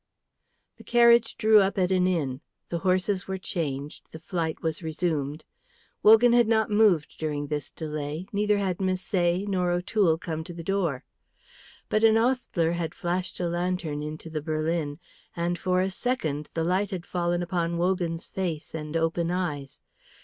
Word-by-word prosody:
The - - -14
carriage 235 -1 +4
drew 220 -1 +6
up 195 0 +1
at 185 -1 +2
an 185 -1 +3
inn; 145 -7 -1 0.3
the 170 - -2
horses 185 +1 0
were 190 0 -2
changed; 150 -6 -4
the - - -8
flight 160 -1 -3
was 160 +1 -2
resumed. 155 -3 -2 0.6
Wogan 225 +3 +7
had 240 -2 +5
not 220 -1 +2
moved 205 -8 +3
during 150 -2 -2
this 150 0 -3
delay, 155 +1 -5
neither 210 0 +2
had 190 -3 -1
Misset 185 0 0
nor 180 -3 0
O'Toole 175 -1 +2
come 160 -1 -4
to 175 - -9
the 170 - -7
door. 170 -8 -1 0.8
But 215 - +1
an 225 0 +6
ostler 225 -9 +1
had 170 -1 -3
flashed 175 +1 -2
a 175 - 0
lantern 175 -3 -2
into 155 +2 -6
the 155 -1 -3
berlin, 155 -1 -1 0.4
and 175 +1 -1
for 185 0 +1
a 190 +1 0
second 155 - -2
the 165 - 0
light 185 +4 +1
had 180 -3 -5
fallen 175 0 -1
upon 170 -1 -1
Wogan's 175 -2 -1
face 170 -5 -4
and 155 0 -3
open 165 +1 0
eyes. 150 -7 -3
175 Hz, 165 wpm, -26 LUFS, 160-190 Hz, 0.8 s, Wogan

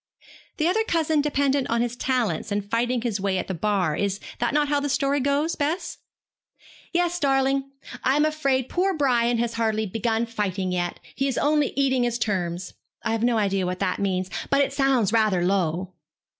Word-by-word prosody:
'The 310 - +1
other 435 +5 +2
cousin 320 -5 +1
dependent 280 -2 +1
on 230 - +1
his 240 0 -1
talents, 240 -9 -1
and 205 0 -2
fighting 240 +1 +1
his 215 -5 -1
way 195 -1 0
at - - -3
the 190 - -3
Bar. 180 -3 0
Is 200 0 -1 0.2
not 240 - +1
that 295 0 +3
how 290 0 +1
the 290 0 -2
story 280 +1 +1
goes, 280 +4 +1
Bess?' 310 +5 -2 0.9
'Yes, 350 0 +1
darling. 270 -1 +1 0.3
I 265 - +3
am 295 +1 +3
afraid 275 -5 0
poor 370 +4 0
Brian 240 -4 +2
has 235 0 -1
hardly 220 -1 0
begun 225 +3 -1
fighting 200 -5 -2
yet. 175 -1 -2
He 275 - -1
is 265 - -2
only 295 -1 +2
eating 265 -2 +2
his 240 -1 0
terms. 185 -5 -2 0.3
I - - -1
have 225 -1 -1
no 240 -1 +3
idea 195 -3 +1
what 180 0 -2
that 185 -1 -1
means, 185 -2 -1 0.2
but 275 0 +3
it 275 - 0
sounds 270 -7 +2
rather 210 -6 +3
low.' 185 -1 0
240 Hz, 190 wpm, -24 LUFS, 200-280 Hz, 0.9 s, that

